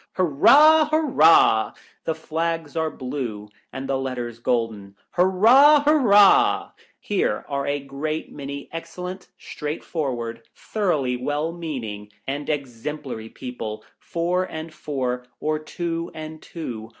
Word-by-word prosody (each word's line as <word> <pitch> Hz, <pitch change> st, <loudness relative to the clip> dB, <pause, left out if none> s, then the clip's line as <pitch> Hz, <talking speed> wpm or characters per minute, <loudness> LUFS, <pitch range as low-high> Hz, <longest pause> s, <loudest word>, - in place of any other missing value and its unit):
Hurrah! 295 Hz, -, +6 dB
hurrah! 165 Hz, -, +4 dB, 0.3 s
The 160 Hz, -, -1 dB
flags 160 Hz, -1 st, -3 dB
are 160 Hz, -1 st, 0 dB
blue 125 Hz, -7 st, -5 dB, 0.2 s
and 135 Hz, 0 st, -6 dB
the 135 Hz, -1 st, 0 dB
letters 120 Hz, -3 st, -4 dB
golden. 115 Hz, -5 st, -2 dB, 0.2 s
Hurrah! 235 Hz, +12 st, +6 dB
hurrah! 230 Hz, -10 st, +5 dB, 0.3 s
Here 205 Hz, -, -1 dB
are 140 Hz, -1 st, -2 dB
a 145 Hz, 0 st, 0 dB
great 145 Hz, +3 st, -4 dB
many 140 Hz, 0 st, -7 dB
excellent, 180 Hz, +3 st, -7 dB
straight 150 Hz, +1 st, -6 dB
forward, 120 Hz, -8 st, -3 dB
thoroughly 150 Hz, -, -1 dB
well 145 Hz, +5 st, -2 dB
meaning, 125 Hz, -12 st, -6 dB, 0.2 s
and 140 Hz, +2 st, -4 dB
ex 135 Hz, -6 st, -3 dB
emplary 135 Hz, -7 st, -5 dB
people, 115 Hz, -4 st, -6 dB, 0.2 s
four 175 Hz, +2 st, -1 dB
and 160 Hz, -2 st, -7 dB
four, 125 Hz, -5 st, -3 dB
or 155 Hz, 0 st, -1 dB
two 165 Hz, +2 st, -4 dB
and 155 Hz, 0 st, -8 dB
two. 120 Hz, -10 st, -7 dB
150 Hz, 120 wpm, -23 LUFS, 125-170 Hz, 0.3 s, Hurrah